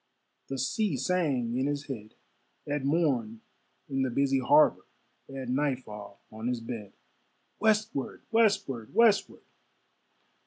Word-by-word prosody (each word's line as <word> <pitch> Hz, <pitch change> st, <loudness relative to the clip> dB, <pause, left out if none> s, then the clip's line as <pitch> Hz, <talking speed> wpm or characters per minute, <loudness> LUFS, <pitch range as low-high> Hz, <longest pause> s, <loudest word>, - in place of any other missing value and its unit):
The 135 Hz, -, -4 dB
sea 145 Hz, -, 0 dB
sang 135 Hz, -6 st, 0 dB
in 130 Hz, +2 st, +1 dB
his 145 Hz, 0 st, -2 dB
head, 110 Hz, -6 st, -7 dB, 0.5 s
At 145 Hz, -1 st, -2 dB
morn 135 Hz, -8 st, 0 dB, 0.5 s
in 135 Hz, -1 st, -1 dB
the 130 Hz, -, +1 dB
busy 135 Hz, +2 st, +2 dB
harbor, 145 Hz, +4 st, +4 dB, 0.4 s
At 135 Hz, -2 st, -6 dB
nightfall 125 Hz, -7 st, -3 dB
on 110 Hz, +2 st, -5 dB
his 125 Hz, -1 st, -1 dB
bed 115 Hz, -4 st, -7 dB, 0.7 s
Westward! 215 Hz, -10 st, 0 dB
westward! 195 Hz, -, +1 dB
westward! 225 Hz, -2 st, +3 dB
135 Hz, 115 wpm, -29 LUFS, 120-150 Hz, 0.7 s, harbor